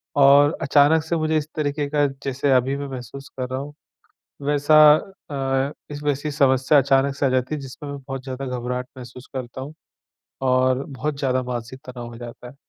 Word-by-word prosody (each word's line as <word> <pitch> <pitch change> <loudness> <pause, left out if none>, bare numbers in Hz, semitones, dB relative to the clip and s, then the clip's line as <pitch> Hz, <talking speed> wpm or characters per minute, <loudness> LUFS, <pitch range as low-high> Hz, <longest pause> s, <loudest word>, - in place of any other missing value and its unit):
और 145 +2 +6
अचानक 145 +2 +4
से 170 +1 -2
मुझे 155 0 +1
इस 150 - -2
तरीके 145 -1 -1
का 145 -1 +2 0.2
जैसे 135 +1 0
अभी 130 +1 +3
मैं 140 0 -5
महसूस 135 +1 -8
कर 125 0 -3
रहा 130 +1 -3
हूँ 145 +1 -7 0.7
वैसा 145 +1 +4 0.5
अ, 135 0 0 0.2
इसमें 145 0 -1
ऐसी 145 +2 -4
समस्या 135 0 +3
अचानक 135 0 +3
से 140 - 0
आ - - +3
जाती 130 +3 0
है 145 - -6
जिसमें 135 +2 -9
मैं 140 - -5
बहुत 135 -1 -5
ज़्यादा 135 +1 -5
घबराहट 125 0 -3
महसूस 125 0 -11
करता 130 0 -6
हूँ, 145 +3 -7 0.7
और 130 0 +2
बहुत 140 +1 -4
ज़्यादा 130 -2 0
मानसिक 125 +1 -6
तनाव 120 -2 -7
हो 120 -1 -10
जाता 120 0 -9
है। 125 - -13
135 Hz, 190 wpm, -22 LUFS, 130-145 Hz, 0.7 s, और